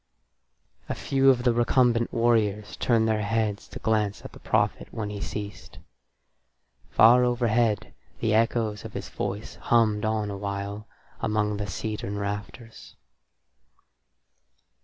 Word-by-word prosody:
A - - -1
few 135 0 +2
of 125 -2 +3
the 120 -1 +3
recumbent 120 0 +2
warriors 110 -3 +1
turned 115 -2 +2
their 110 -1 +1
heads 105 -1 -1
to - - -9
glance 105 -2 0
at - - -8
the - - -12
prophet - - 0
when 105 -2 -4
he 100 -1 -6
ceased. 105 -1 -6 1.1
Far 120 +3 +6
overhead 120 -3 +1 0.3
the 110 -2 +1
echoes 110 -2 +1
of - - -8
his - - -6
voice 105 +2 -5
hummed 110 -3 +2
on 110 -1 -1
awhile 100 +1 -5 0.3
among 105 -1 0
the 105 0 -3
cedarn 105 +1 -4
rafters. 100 +3 -6
110 Hz, 125 wpm, -26 LUFS, 105-115 Hz, 1.1 s, Far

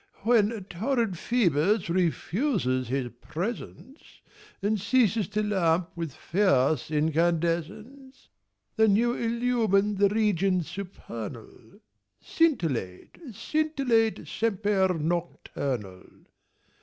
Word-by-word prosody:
When 220 -2 +2
torrid 225 +5 -1
Ph[oe]bus 185 - +1
refuses 170 - 0
his 130 -1 -2
presence 235 - -6 0.6
And 205 0 -1
ceases 220 -3 +2
to 210 +1 -1
lamp 180 -4 +1
with 165 -3 -4
fierce 155 -7 +1
incandescence, 170 - -1 0.5
Then 220 -2 +5
you 240 +3 +2
illumine 230 -4 +1
the 200 0 +4
regions 195 -5 +1
supernal, 120 - -9 0.4
Scintillate, 160 - -1 0.2
scintillate, 260 -4 0
semper 205 -3 +1
nocturnal. 140 - -3
195 Hz, 80 wpm, -27 LUFS, 160-225 Hz, 0.6 s, Then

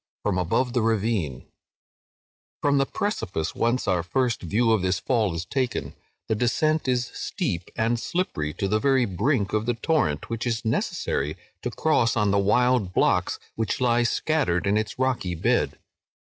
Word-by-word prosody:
(FROM 95 -3 +1
ABOVE 120 +8 0
THE 120 - +2
RAVINE) 105 - 0 1.1
From 140 -1 +2
the 135 - +2
precipice 100 - -2
whence 120 +2 0
our 90 -3 +2
first 120 +7 0
view 115 +7 +1
of 110 -3 +3
this 95 0 0
Fall 110 -9 0
is 85 +2 -3
taken, 130 0 -2 0.3
the - - +1
descent 150 +7 +1
is 125 -1 0
steep 105 - -3
and 115 +1 +1
slippery 110 - -2
to 100 - -1
the 105 +2 +1
very 135 0 +3
brink 105 - 0
of 110 +1 0
the 120 - +1
torrent, 115 - 0
which 115 +1 -3
it - - +2
is 115 0 -2
necessary 75 -8 -1 0.2
to - - -2
cross 125 -8 +1
on 105 -2 +2
the 100 - +3
wild 105 -1 +2
blocks - - +2 0.2
which 110 -3 -2
lie 120 -1 +3
scattered 120 - +1
in 100 +1 +2
its 110 0 -1
rocky 125 -9 0
bed. - - +1
115 Hz, 170 wpm, -25 LUFS, 95-125 Hz, 1.1 s, of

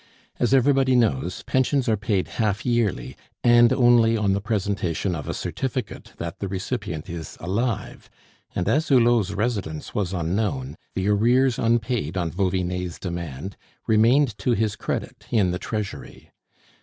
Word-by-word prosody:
As 120 - +1
everybody 135 0 +4
knows, 110 - +1
pensions 130 0 +1
are 110 - +3
paid 100 -2 -1
half 105 -3 -1
yearly, 115 - 0 0.3
and 120 -1 +6
only 120 -3 +4
on 100 -2 +1
the 100 - -1
presentation 100 -4 -1
of 75 -4 -5
a - - -1
certificate 130 -3 -4
that 85 0 -6
the 100 - -3
recipient 95 -3 -4
is 85 -3 -7
alive: 105 +6 -3 0.5
and 90 - -1
as 155 +3 +2
Hulot's 120 -6 +4
residence 100 -8 -3
was 95 -4 -1
unknown, 105 - -2 0.2
the 95 +1 -1
arrears 120 +5 +3
unpaid 115 - 0
on 85 -3 -1
Vauvinet's 90 -2 -1
demand 85 -1 -5 0.3
remained 115 +3 +4
to 120 +5 +1
his 110 -2 0
credit - - -5
in 100 -6 +2
the 90 - -3
Treasury. 105 -2 -6
105 Hz, 145 wpm, -24 LUFS, 90-120 Hz, 0.5 s, and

